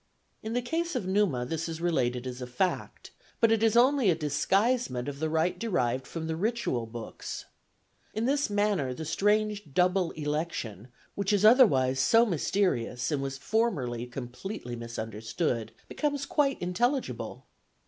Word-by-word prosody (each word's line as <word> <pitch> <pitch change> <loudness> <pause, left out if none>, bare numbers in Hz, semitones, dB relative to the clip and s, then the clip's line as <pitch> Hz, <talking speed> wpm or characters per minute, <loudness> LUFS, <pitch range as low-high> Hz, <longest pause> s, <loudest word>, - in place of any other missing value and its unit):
In 220 +1 -4
the 245 0 0
case 335 +6 -2
of - - -1
Numa 190 -10 +1
this 165 +4 -3
is 165 -1 -5
related 125 -8 0
as 125 0 -6
a 125 - -4
fact, 150 +10 -2 0.3
but 230 -1 +4
it 225 -1 +3
is 225 0 +3
only 260 -2 +5
a 170 - +4
disguisement 160 - +1
of 140 -1 -5
the 160 +1 0
right 160 +3 0
derived 130 - 0
from 165 -1 -5
the 160 0 -2
ritual 185 - -1
books. 115 0 -7 0.7
In 220 +2 -2
this 280 +1 +1
manner 205 -11 +1
the 160 - -6
strange 205 -1 0
double 180 0 +3
election, 150 - -3 0.3
which 200 0 -1
is 205 0 +3
otherwise 135 - +6
so 230 - +5
mysterious 160 - 0
and 145 -2 0
was 135 -1 -3
formerly 135 - -1
completely 125 - -6
misunderstood, 115 +1 -3 0.2
becomes 290 -2 -1
quite 285 -1 +1
intelligible. 240 +10 -1
170 Hz, 150 wpm, -29 LUFS, -, 0.7 s, otherwise